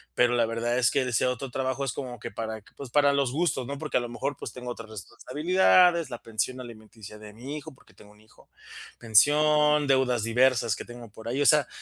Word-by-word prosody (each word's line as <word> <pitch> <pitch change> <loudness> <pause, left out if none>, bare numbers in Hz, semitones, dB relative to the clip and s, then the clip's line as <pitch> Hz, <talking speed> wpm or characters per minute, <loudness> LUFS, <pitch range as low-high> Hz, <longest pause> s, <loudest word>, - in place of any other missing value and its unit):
pero 120 0 +3
la 120 -2 +2
verdad 120 +2 -1
es 120 - +4
que 140 - +1
ese 125 -1 0
otro 125 +1 -4
trabajo 130 +1 -2
es 135 - -2
como 125 -3 -6
que - - -7
para 110 -2 -6
pues 140 -3 -9
para 145 +2 +3
los 140 -3 0
gustos, 145 -4 -1
¿no?, 140 - -5
porque 150 +1 -2
a - - +3
lo 120 -1 -5
mejor 130 +4 -4
pues - - -7
tengo 125 -1 -7
otras 115 -2 -9
responsabilidades, 170 - +2
la 120 - -6
pensión 115 +3 -3
alimenticia 110 -3 -12
de 105 -1 -11
mi 125 +7 -8
hijo, 150 - -9
porque - - -24
tengo 105 - -18
un 105 0 -22
hijo, 110 - -23 0.5
pensión, 150 +6 +3
deudas 130 -4 +1
diversas 120 -1 +2
que - - -7
tengo 120 -1 -11
por 110 +2 -11
ahí, 130 +4 -2
o - - -1
sea, 150 -4 +4
125 Hz, 225 wpm, -26 LUFS, 115-140 Hz, 0.5 s, es